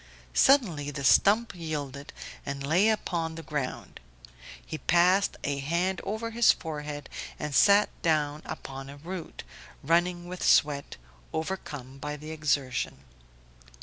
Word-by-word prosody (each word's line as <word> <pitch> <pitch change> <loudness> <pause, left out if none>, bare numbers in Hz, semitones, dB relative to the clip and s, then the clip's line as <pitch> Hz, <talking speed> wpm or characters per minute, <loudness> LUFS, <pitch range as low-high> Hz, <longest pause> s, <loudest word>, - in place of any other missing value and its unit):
Suddenly 185 - +4
the 145 -1 -5
stump 215 +11 +4
yielded 145 -5 -5 0.3
and 140 0 -4
lay 180 +9 +4
upon 170 -6 -1
the 165 - -7
ground; 145 -5 -4 0.7
he - - -6
passed 180 +3 +3
a 140 -1 -1
hand 170 +6 0
over 220 +2 -3
his 235 0 +6
forehead 150 -3 -5 0.3
and 150 - -4
sat 205 +6 +6
down 150 -3 +1
upon 135 -3 -7
a 140 - -10
root, 170 +3 -7 0.4
running 175 +3 +1
with 180 0 -7
sweat, 145 -1 +3 0.4
overcome 145 -6 -5
by 150 +1 -4
the 155 +2 -8
exertion. 140 - -1
155 Hz, 125 wpm, -28 LUFS, 145-180 Hz, 0.7 s, his